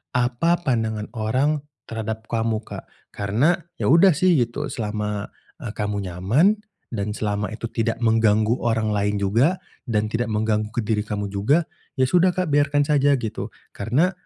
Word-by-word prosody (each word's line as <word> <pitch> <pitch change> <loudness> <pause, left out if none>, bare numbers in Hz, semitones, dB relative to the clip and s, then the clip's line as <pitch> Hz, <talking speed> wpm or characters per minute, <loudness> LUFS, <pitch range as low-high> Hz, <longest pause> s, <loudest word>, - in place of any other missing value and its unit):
apa 125 +7 +2
pandangan 110 -6 -1
orang 130 +7 0 0.2
terhadap 110 -1 -5
kamu, 115 -1 0
Kak. - - -9 0.2
Karena 120 - +1 0.2
ya - - +1
udah 170 +1 +6
sih 175 -1 +3
gitu 120 +5 -2
selama, 105 -2 -3 0.3
eee, 110 - -5
kamu 105 -1 -2
nyaman 115 - +3 0.4
dan 100 0 -2
selama 105 0 -2
itu 115 +1 -5
tidak 115 0 -2
mengganggu 110 -1 +3
orang 110 -2 +1
lain 100 0 0
juga, 120 - +2 0.2
dan 110 -4 0
tidak 115 +1 -2
mengganggu 105 0 0
ke 120 - -3
diri 110 -1 0
kamu 105 -1 -3
juga, 110 +12 +1 0.3
ya - - +5
sudah 180 +4 +4
Kak 185 -2 0
biarkan 145 0 +3
saja 145 -1 +4
gitu. 110 -3 -4 0.3
Karena 130 - +1
115 Hz, 155 wpm, -23 LUFS, 105-140 Hz, 0.4 s, udah